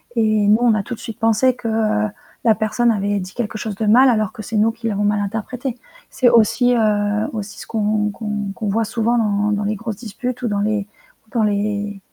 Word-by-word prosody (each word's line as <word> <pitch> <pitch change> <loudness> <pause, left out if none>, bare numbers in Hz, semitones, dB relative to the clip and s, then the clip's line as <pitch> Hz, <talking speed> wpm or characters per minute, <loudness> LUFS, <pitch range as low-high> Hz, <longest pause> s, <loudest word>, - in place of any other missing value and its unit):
et 215 -2 +2
nous 210 +1 +6
on 235 -2 +4
a 210 - +1
tout 245 - -5
de - - -18
suite 225 - -8
pensé 225 +3 +3
que, 235 - -6
heu, 215 -1 +1 0.4
la 220 - +6
personne 220 +2 +1
avait 205 -1 0
dit 185 0 -7
quelque 220 -2 -3
chose 215 -2 -4
de 220 - -2
mal 250 +5 +6
alors 215 -4 +1
que 215 - -8
c'est 225 - -6
nous 220 +2 +3
qui 230 0 -6
l'avons 205 0 -1
mal 205 0 +2
interprété. 230 +5 -4 0.3
C'est 250 -2 +3
aussi, 245 +2 +4
heu, 210 -1 +1
aussi 210 -1 -6
ce - - -9
qu'on 210 -1 0
qu'on 210 -1 -4
qu'on 215 - -4
voit 225 +2 +1
souvent 235 +2 0
dans 210 -1 +1
dans 205 0 0
les 215 +1 -1
grosses 220 -1 -5
disputes 250 +2 -5
ou - - +1
dans 205 -1 -1
les 210 -1 -1 0.4
ou - - -27
dans 230 -4 +1
les 205 -1 -1
215 Hz, 235 wpm, -20 LUFS, 205-230 Hz, 0.4 s, nous